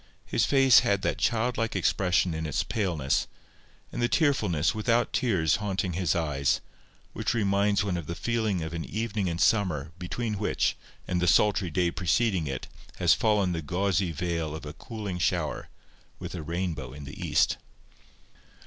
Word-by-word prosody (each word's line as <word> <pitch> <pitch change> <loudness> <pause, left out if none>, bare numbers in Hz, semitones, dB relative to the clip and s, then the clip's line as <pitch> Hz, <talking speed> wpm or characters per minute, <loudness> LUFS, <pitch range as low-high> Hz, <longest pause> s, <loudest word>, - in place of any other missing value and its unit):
His - - +1
face 135 -3 +6
had 100 -1 0
that - - -1
child 120 +1 +1
like 115 0 -1
expression 90 -2 +2
in 80 0 -3
its 75 +1 0
paleness, 85 - 0 0.6
and - - -4
the 120 - +3
tearfulness 105 - +2
without 115 +2 +1
tears 95 - +2
haunting 95 -3 -2
his 90 -3 0
eyes, 75 -5 +1 0.5
which - - -1
reminds 100 -1 +2
one 95 -3 -1
of 85 -4 -6
the 85 - -4
feeling 110 -7 -1
of 80 +1 -5
an 85 -1 -3
evening 110 -2 -2
in 85 -1 -2
summer 85 -8 +1
between 105 +4 -3
which 105 - 0 0.3
and 90 -1 0
the 90 - +1
sultry 100 +2 +3
day 85 +2 +1
preceding 90 0 +1
it 65 -2 -4 0.3
has - - +4
fallen 105 -4 +2
the 85 -2 -2
gauzy 90 +3 0
veil 85 -1 -2
of 80 - -8
a 75 - -6
cooling 100 +1 -6
shower, 80 - -1 0.5
with - - -7
a 90 - -4
rainbow 80 -5 -3
in 75 +1 -9
the 70 - -9
east. - - +2
90 Hz, 165 wpm, -27 LUFS, 80-105 Hz, 0.6 s, face